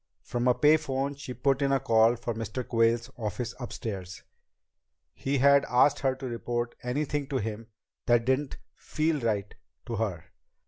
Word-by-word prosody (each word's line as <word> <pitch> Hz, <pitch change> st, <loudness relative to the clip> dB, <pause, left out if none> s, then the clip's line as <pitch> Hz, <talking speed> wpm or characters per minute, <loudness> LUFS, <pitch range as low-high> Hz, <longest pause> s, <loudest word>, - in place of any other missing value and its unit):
From 120 Hz, 0 st, -1 dB
a 125 Hz, -, +4 dB
pay 150 Hz, +1 st, +5 dB
phone 140 Hz, -2 st, -2 dB
she 135 Hz, -3 st, -8 dB
put 135 Hz, +2 st, +1 dB
in 140 Hz, 0 st, +2 dB
a 135 Hz, -, +3 dB
call 115 Hz, 0 st, +4 dB
for 120 Hz, 0 st, -4 dB
Mr. 115 Hz, +3 st, -5 dB
Quayle's 115 Hz, +1 st, +2 dB
office 115 Hz, +1 st, -3 dB
upstairs. 100 Hz, -7 st, -6 dB, 0.9 s
He 140 Hz, +1 st, -1 dB
had 140 Hz, +1 st, +5 dB
asked 125 Hz, +3 st, +4 dB
her 135 Hz, -1 st, +1 dB
to 130 Hz, -, -8 dB
report 120 Hz, 0 st, -3 dB
anything 140 Hz, +3 st, -2 dB
to 135 Hz, -, -1 dB
him 110 Hz, 0 st, -4 dB, 0.4 s
that 120 Hz, -1 st, +4 dB
didn't 130 Hz, +2 st, 0 dB, 0.2 s
"feel" 155 Hz, 0 st, -1 dB
right 105 Hz, -4 st, -1 dB, 0.3 s
to 115 Hz, -, -4 dB
her. 95 Hz, -6 st, -2 dB
125 Hz, 165 wpm, -28 LUFS, 115-135 Hz, 0.9 s, pay